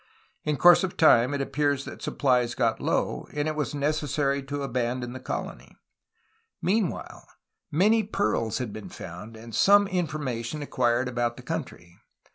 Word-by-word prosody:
In 150 -1 0
course 175 +2 +7
of 185 - -3
time 125 -5 +5
it 140 -1 -1
appears 145 0 0
that - - -8
suppHes 125 -4 +1
got - - +1
low, - - -1
and 150 +1 -1
it 155 - -2
was 150 -1 -2
necessary 145 -1 0
to 140 +1 -4
abandon 125 -1 -2
the 130 - -7
colony. 130 - -6 0.8
Meanwhile 195 0 -2 0.4
many 210 +8 +3
pearls 110 - -1
had 120 -5 -4
been 110 - -8
found 95 +6 -9
and 115 +1 -11
some 200 - +5
information 150 - -3
acquired 125 -2 +1
about 120 -1 -1
the - - -10
country. 85 0 -6
140 Hz, 150 wpm, -26 LUFS, 120-155 Hz, 0.8 s, course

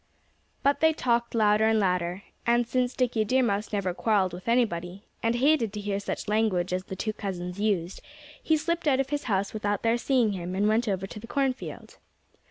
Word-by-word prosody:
But 280 +1 +3
they 320 0 +4
talked 235 -5 0
louder 215 0 +4
and 220 0 +3
louder. 180 -1 0 0.2
And 235 0 +2
since 250 0 0
Dickie 245 -3 +1
Deer 255 +5 +2
Mouse 205 -2 -1
never 195 -4 -1
quarreled 195 -2 +1
with 180 +4 -9
anybody, 200 -6 0 0.2
and 230 +1 +1
hated 260 -3 +3
to 210 - -4
hear 205 -1 -2
such 200 - -4
language 205 -4 +1
as 185 0 -2
the 190 - -6
two 215 +3 -2
cousins 185 -3 -5
used, 195 -4 -1 0.4
he 315 - +2
slipped 335 +2 -2
out 270 -2 +3
of 270 +1 -1
his 290 0 -2
house 200 -3 0
without 205 -1 -2
their 230 +1 +2
seeing 245 -4 +2
him 180 -1 -4
and 205 +2 +2
went 225 +2 +2
over 195 -2 -1
to 200 - -9
the 230 - -10
cornfield. 265 0 -3
215 Hz, 200 wpm, -27 LUFS, 195-240 Hz, 0.4 s, they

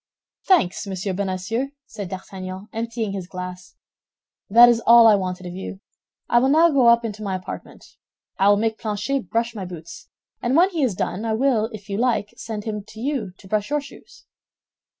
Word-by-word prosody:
"Thanks, 205 - +2
Monsieur 190 0 -3
Bonacieux," 200 +7 -2 0.2
said 205 -4 -7
D'Artagnan, 190 +1 -7
emptying 225 -1 -3
his 190 -3 -5
glass, 180 0 -8 0.7
"that 235 +4 +9
is 235 -1 +3
all 235 0 +9
I 220 - +8
wanted 185 -2 -2
of 175 - -6
you. 190 +1 -7 0.5
I 240 - +4
will 260 +2 +2
now 325 +3 +5
go 265 -4 +4
up 235 0 +5
into 215 -1 -5
my 195 -3 -2
apartment. 185 - -9 0.4
I 195 +1 +5
will 205 - +5
make 220 +1 -1
Planchet 215 +1 -2
brush 230 0 0
my 205 -4 -6
boots; 170 -2 -10 0.3
and 255 +4 +1
when 365 +3 +5
he 330 -4 -2
has 245 -8 +1
done, 195 +3 -3
I 225 -1 -1
will, 225 -2 +1
if 205 -3 -10
you 200 0 -3
like, 235 -4 0
send 220 -2 -6
him 210 -2 -4
to 220 0 -12
you 245 -7 -2
to 190 - -15
brush 210 +3 -1
your 295 0 +1
shoes." 285 - -14
215 Hz, 190 wpm, -22 LUFS, 190-235 Hz, 0.7 s, that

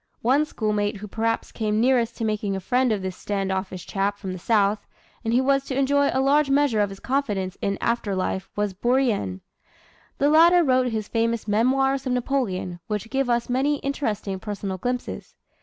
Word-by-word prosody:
One 270 +6 +3
schoolmate 210 -6 -1
who 210 +2 -8
perhaps 225 +2 -2
came 215 -1 -1
nearest 240 -1 +2
to 225 - -2
making 210 -2 -1
a - - -2
friend 250 +5 +1
of 205 -3 -1
this 185 -1 -4
stand 195 -1 -2
offish 190 -1 -4
chap 200 +1 -1
from 190 -2 -5
the 185 - -7
South, 205 0 +1 0.4
and 225 - -1
who 250 +3 +3
was 275 0 +2
to 265 - -3
enjoy 280 +1 +3
a 265 - +1
large 290 +1 +3
measure 275 -5 +3
of 205 - +1
his 195 0 -9
confidence 205 -9 -1
in 200 0 -1
after 230 -4 -1
life 190 +1 -2
was 205 -1 -1
Bourrienne. 220 - 0 0.8
The 285 +1 +3
latter 340 +3 +6
wrote 255 -3 +3
his 220 -3 -3
famous 230 -1 -1
"Memoirs 265 +5 +2
of 250 - 0
Napoleon," 235 -9 -1
which 210 +1 -4
give 270 -1 0
us 235 0 +1
many 270 +4 +1
interesting 220 -8 -2
personal 200 -2 -5
glimpses. 245 +4 -4
225 Hz, 190 wpm, -24 LUFS, 200-265 Hz, 0.8 s, latter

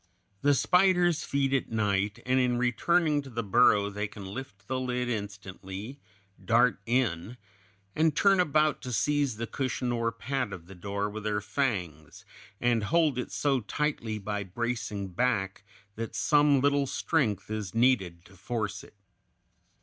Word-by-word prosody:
The 145 0 +4
spiders 180 +1 +3
feed 140 -1 0
at 135 - 0
night, 105 -1 0
and 130 +1 +2
in 125 -1 +2
returning 150 +5 +2
to 140 - -11
the 115 -1 -3
burrow 105 -1 +4
they 105 +1 -3
can 100 -1 -10
lift 100 -2 -8
the 130 -1 -1
lid 125 -1 -2
instantly, 100 +2 -6 0.4
dart 120 -2 +3
in, 115 -3 0 0.6
and 160 -1 +2
turn 195 -2 +4
about 155 -3 +2
to 125 - -5
seize 140 +1 +1
the 115 - -3
cushion 125 0 -2
or 115 -1 0
pad 115 -2 -3
of 85 -3 -9
the 95 - -12
door 100 +2 -3
with 105 +1 -7
their 105 -1 0
fangs, 100 - -3 0.3
and 120 -3 +1
hold 150 +2 +2
it 125 - -4
so 140 -2 +1
tightly 115 -2 -2
by 105 0 -3
bracing 105 -1 -3
back 95 -1 -1 0.3
that 115 +2 -6
some 145 -2 +4
little 140 0 +2
strength 115 - -1
is 105 -2 -4
needed 100 -9 +2
to 95 - -17
force 105 +1 -4
it. - - -17
115 Hz, 155 wpm, -28 LUFS, 100-135 Hz, 0.6 s, The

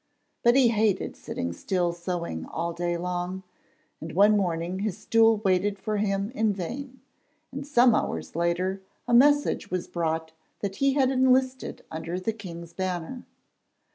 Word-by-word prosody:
But 240 +1 +5
he 260 -3 +6
hated 215 -3 +1
sitting 85 0 -4
still 175 - -1
sewing 170 - -4
all 170 +1 -3
day 175 0 -1
long, 180 +1 -3 0.6
and 160 0 -7
one 205 +4 +5
morning 175 -1 -1
his 200 -2 -2
stool 225 +1 +4
waited 195 +2 +2
for 215 +1 -2
him 200 +1 -1
in 220 -4 +1
vain, 250 +8 -6 0.5
and 280 +2 -6
some 245 -4 +5
hours 80 - -2
later 180 +3 0 0.3
a 240 - 0
message 290 +4 +4
was 180 0 -2
brought 160 -1 -2 0.3
that 195 -1 -3
he 275 0 +3
had 265 -2 +3
enlisted 260 0 +1
under 165 +3 -4
the 220 +4 -2
king's 170 -5 -9
banner. 185 +6 -4
190 Hz, 150 wpm, -26 LUFS, 170-230 Hz, 0.6 s, he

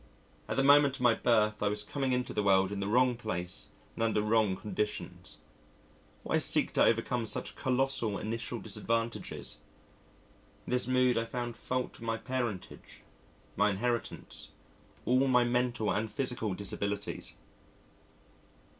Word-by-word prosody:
At - - -3
the 135 - +3
moment 140 -1 +6
of 140 - -9
my 120 -1 +6
birth 110 -3 +2
I 105 - +2
was 105 0 0
coming 135 +4 -2
into 125 0 -1
the 105 - +1
world 95 -1 +3
in 100 - -3
the 100 - -2
wrong 125 +3 +3
place 95 -6 -4 0.3
and - - -6
under 110 -2 +2
wrong 105 -3 +3
conditions. 105 +1 -4 0.9
Why - - +1
seek - - +3
to - - +4
overcome 115 +1 +1
such - - -3
colossal 130 -5 0
initial 115 +2 -4
disadvantages? 115 +2 -3 1.1
In - - -7
this 125 -1 +2
mood 130 -2 +3
I 115 - -2
found 120 0 -4
fault 125 +2 -2
with - - -15
my 115 -1 -1
parentage, 120 -7 -5 0.5
my 105 +2 +3
inheritance, 115 +4 -3 0.6
all 130 +2 +3
my 125 -2 +5
mental 120 -2 0
and 110 +1 -2
physical 125 -7 -2
disabilities.... 100 +1 -3
115 Hz, 145 wpm, -31 LUFS, 105-125 Hz, 1.1 s, moment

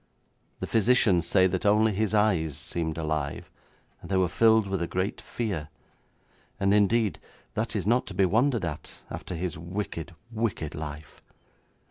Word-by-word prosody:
The - - -1
physicians 110 -6 +3
say 95 -2 +4
that 95 -1 0
only 105 +1 +4
his 105 +1 0
eyes 95 -9 +2
seemed 80 -2 -3
alive, 75 -3 -3 0.5
and - - -11
they 95 - +1
were 95 -1 +3
filled 110 +3 +4
with 95 -2 -2
a 85 - -1
great 95 +4 -2
fear, 95 -11 -4 0.9
and 100 0 +3
indeed 105 +1 +3 0.3
that 110 +1 -2
is 95 -4 -1
not 120 +4 +2
to - - -7
be 95 - +4
wondered 115 +2 +2
at, 75 -3 -7
after 90 - -5
his 85 -1 -3
wicked, 85 -1 -5 0.2
wicked 110 -9 -2
life. 75 -1 -8
95 Hz, 155 wpm, -27 LUFS, 85-110 Hz, 0.9 s, say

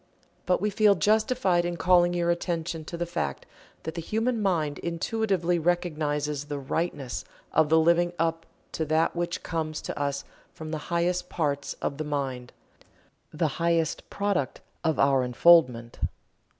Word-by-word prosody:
But 180 - +3
we 210 +2 0
feel 205 0 +5
justified 210 -1 +2
in 175 0 -3
calling 175 0 +4
your 170 0 +2
attention 170 -2 -2
to 170 - -6
the 175 - -1
fact 170 - -3 0.4
that 160 - -4
the 170 - -4
human 225 +6 -1
mind 160 -7 0
intuitively 175 0 0
recognizes 150 -4 -1
the 145 -1 -4
"Rightness" 140 -2 -3 0.3
of 160 -1 +4
the 160 - +5
living 170 +2 +3
up 165 0 -1 0.2
to 160 - -2
that 160 +3 +1
which 175 +1 -2
comes 155 -2 -3
to - - -5
us 140 -1 -1 0.3
from 155 -1 -7
the 155 - -2
highest 175 +1 0
parts 145 -4 -1
of 140 - -2
the - - -1
mind 135 -4 -3 0.8
the 160 +1 0
highest 165 -2 0
product 200 -9 -1 0.2
of 160 -3 +1
our 135 -1 +4
unfoldment. 125 -2 +4
165 Hz, 150 wpm, -27 LUFS, 150-175 Hz, 0.8 s, feel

